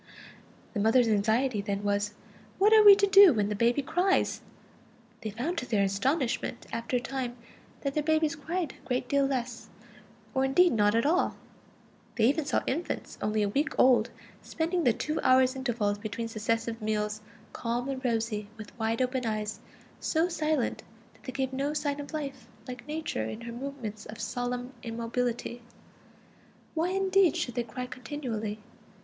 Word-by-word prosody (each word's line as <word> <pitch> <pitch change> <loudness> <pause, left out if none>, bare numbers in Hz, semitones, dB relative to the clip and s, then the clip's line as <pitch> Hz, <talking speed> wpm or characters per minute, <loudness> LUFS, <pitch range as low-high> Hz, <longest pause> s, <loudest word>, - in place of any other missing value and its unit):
The 215 - -2
mothers' 225 +3 +4
anxiety 220 +2 +2
then 200 0 -3
was: 205 0 0 0.4
what 415 +3 +5
are 435 -1 +8
we 405 -1 +11
to 400 0 +3
do 390 -4 +8
when 210 -3 0
the 210 - -1
baby 240 +6 +2
cries? 360 +7 +1 0.8
They 215 - -3
found 275 - -2
to 255 - -6
their 210 -4 +2
astonishment 240 +5 -1
after 230 +2 -1
a - - 0
time 255 -1 -4 0.5
that 275 -1 -2
their 300 - +1
babies 315 +1 +1
cried 325 +1 -3
a - - -20
great 250 0 -1
deal 280 0 +2
less, 250 -3 -3 0.6
or 265 - +1
indeed 340 +7 +4
not 210 -1 +3
at 230 - +2
all; 345 +5 +2 0.8
they 225 - +1
even 285 +5 +2
saw - - 0
infants 325 +7 -3
only 215 0 +1
a 205 - +1
week 290 +9 -1
old 245 -3 +5 0.3
spending 335 +1 -1
the 240 - +5
two 305 +7 -2
hours' 255 0 +4
intervals 230 -6 -1
between 215 +2 -4
successive 225 +1 -2
meals 215 0 -1 0.3
calm 240 +2 -2
and 270 -1 -4
rosy, 225 -3 -1
with 215 -2 -10
wide 225 +2 +1
open 255 0 -1
eyes, 215 -1 -2 0.4
so 325 +2 +1
silent 310 -6 -1 0.3
that - - -23
they 260 - -4
gave 265 0 -2
no 280 +3 -1
sign 290 -1 -1
of 285 - -7
life, 275 -6 -5 0.2
like 250 +1 -8
Nature 305 - -3
in 215 - -6
her 235 0 -7
moments 240 -5 -6
of 215 +1 -9
solemn 245 +2 -3
immobility. 235 +1 -3 1.1
Why 330 +2 0
indeed 385 -2 +3
should 245 - -2
they 240 - 0
cry 245 +2 -5
continually? 245 -4 -5
250 Hz, 165 wpm, -29 LUFS, 220-290 Hz, 1.1 s, we